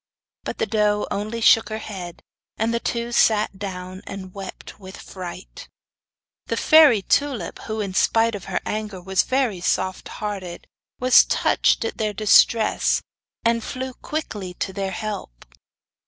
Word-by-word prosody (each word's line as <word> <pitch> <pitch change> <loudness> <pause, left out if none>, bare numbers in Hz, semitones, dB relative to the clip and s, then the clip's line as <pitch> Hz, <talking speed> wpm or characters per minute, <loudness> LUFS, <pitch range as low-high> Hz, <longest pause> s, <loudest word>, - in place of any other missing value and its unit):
But - - -4
the - - 0
doe 210 -1 +1
only 215 +3 -3
shook 225 -1 +5
her 215 - -3
head; 190 -6 -8 0.3
and 225 +2 0
the 235 - +1
two 235 0 -3
sat 215 -4 +2
down 185 -1 -6
and 190 -2 -8
wept 195 0 -9
with 190 -1 -10
fright. 185 - -9 0.8
The - - -2
fairy 300 - +6
Tulip, 260 -7 0
who, 220 -1 -3
in 195 -2 -4
spite 225 +4 +2
of 200 -4 -6
her - - -2
anger, 210 -3 -4
was 190 +1 +1
very 255 -9 0
soft 185 +1 -1
hearted, 195 -5 -6 0.3
was 255 0 +7
touched - - +2
at - - -5
their 215 -1 -1
distress, 215 +2 +3 0.4
and 230 0 +2
flew 260 +2 -5
quickly 210 - -5
to 190 - -4
their 195 0 -2
help. 190 - -6
210 Hz, 150 wpm, -22 LUFS, 190-230 Hz, 0.8 s, was